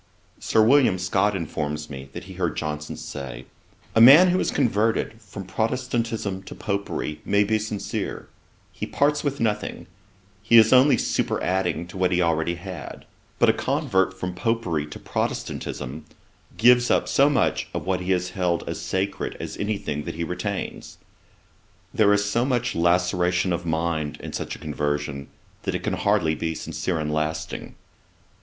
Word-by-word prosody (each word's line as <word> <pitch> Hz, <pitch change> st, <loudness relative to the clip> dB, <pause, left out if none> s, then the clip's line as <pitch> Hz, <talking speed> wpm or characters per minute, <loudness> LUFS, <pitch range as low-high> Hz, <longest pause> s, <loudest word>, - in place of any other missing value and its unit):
Sir 110 Hz, -, +3 dB
William 125 Hz, -4 st, +5 dB
Scott 95 Hz, +3 st, +1 dB
informs 75 Hz, -3 st, -3 dB
me, 70 Hz, -1 st, -8 dB
that -, -, -7 dB
he -, -, -10 dB
heard -, -, -2 dB
Johnson 75 Hz, 0 st, -4 dB
say, 70 Hz, -3 st, -7 dB, 0.5 s
'A 115 Hz, -, +4 dB
man 150 Hz, +10 st, +9 dB
who 180 Hz, +1 st, +2 dB
is -, -, 0 dB
converted 110 Hz, -2 st, 0 dB
from 100 Hz, -1 st, -8 dB
Protestantism 115 Hz, -2 st, -2 dB
to 95 Hz, -, -10 dB
Popery 100 Hz, -7 st, -3 dB
may 100 Hz, 0 st, +3 dB
be 110 Hz, +1 st, +1 dB
sincere: 105 Hz, -1 st, -4 dB, 0.4 s
he -, -, -5 dB
parts 145 Hz, +1 st, +1 dB
with 140 Hz, -1 st, -2 dB
nothing: 105 Hz, -3 st, -2 dB, 0.6 s
he 115 Hz, +2 st, +5 dB
is 110 Hz, +1 st, +7 dB
only 130 Hz, +3 st, +6 dB
superadding 90 Hz, -2 st, 0 dB
to 90 Hz, +2 st, -10 dB
what 90 Hz, 0 st, +2 dB
he 90 Hz, -, +2 dB
already 85 Hz, 0 st, +1 dB
had. 85 Hz, -5 st, -8 dB, 0.3 s
But -, -, +4 dB
a -, -, +5 dB
convert 95 Hz, 0 st, 0 dB
from 90 Hz, -1 st, -3 dB
Popery 90 Hz, -7 st, -1 dB
to 75 Hz, -, -8 dB
Protestantism 75 Hz, +5 st, -4 dB, 0.5 s
gives 125 Hz, 0 st, +5 dB
up -, -, +2 dB
so 140 Hz, +2 st, +4 dB
much 145 Hz, -, +1 dB
of -, -, -4 dB
what 95 Hz, -1 st, 0 dB
he 90 Hz, +1 st, -5 dB
has 90 Hz, 0 st, 0 dB
held 90 Hz, -2 st, -1 dB
as -, -, -4 dB
sacred 95 Hz, +1 st, -2 dB
as -, -, -5 dB
any 105 Hz, 0 st, -1 dB
thing 75 Hz, -5 st, -4 dB
that -, -, -5 dB
he 85 Hz, -, -3 dB
retains; 80 Hz, -, -4 dB, 1.0 s
there 105 Hz, -2 st, +4 dB
is 105 Hz, 0 st, +3 dB
so 115 Hz, +4 st, +1 dB
much 125 Hz, -2 st, 0 dB
laceration 90 Hz, +1 st, +2 dB
of 85 Hz, 0 st, -3 dB
mind 80 Hz, -2 st, -1 dB
in -, -, -8 dB
such -, -, -4 dB
a -, -, -10 dB
conversion, 75 Hz, -2 st, -3 dB, 0.3 s
that -, -, -2 dB
it -, -, -3 dB
can -, -, -1 dB
hardly 80 Hz, -, +2 dB
be 80 Hz, +1 st, -3 dB
sincere 90 Hz, +2 st, -3 dB
and 75 Hz, -1 st, -2 dB
lasting.' 80 Hz, +1 st, -3 dB
95 Hz, 165 wpm, -24 LUFS, 80-110 Hz, 1.0 s, man